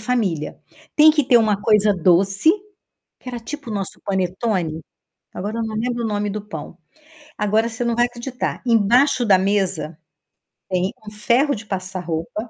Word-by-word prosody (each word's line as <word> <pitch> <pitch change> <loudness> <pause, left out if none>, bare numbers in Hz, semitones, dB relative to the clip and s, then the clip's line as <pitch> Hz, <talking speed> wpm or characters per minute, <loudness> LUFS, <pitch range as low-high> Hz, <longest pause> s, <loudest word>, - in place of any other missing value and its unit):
família. 215 -10 -1 0.4
Tem 310 +1 +8
que 300 -3 +1
ter 250 -2 +5
uma 215 -3 +2
coisa 210 -1 +4
doce, 195 - +3 0.7
que 255 - -11
era 245 -1 -4
tipo 285 0 -7
o - - -3
nosso 195 -1 -5
panetone? 185 -3 -1 0.5
Agora 210 +5 -4
eu - - -1
não 220 -1 -4
lembro 240 +1 -2
o - - 0
nome 205 -1 -1
do 215 - -4
pão. 190 -3 -8 0.6
Agora, 215 +2 +1
você 235 +1 -4
não 235 - 0
vai 240 +1 +3
acreditar. 245 +1 -5
Embaixo 240 +4 +3
da 195 -4 +5
mesa, 190 -5 -1 0.7
tem 185 +2 0
um 210 - -8
ferro 240 +7 +2
de 215 - -9
passar 185 -1 -4
roupa 175 +7 -4
210 Hz, 170 wpm, -21 LUFS, 190-240 Hz, 0.7 s, Tem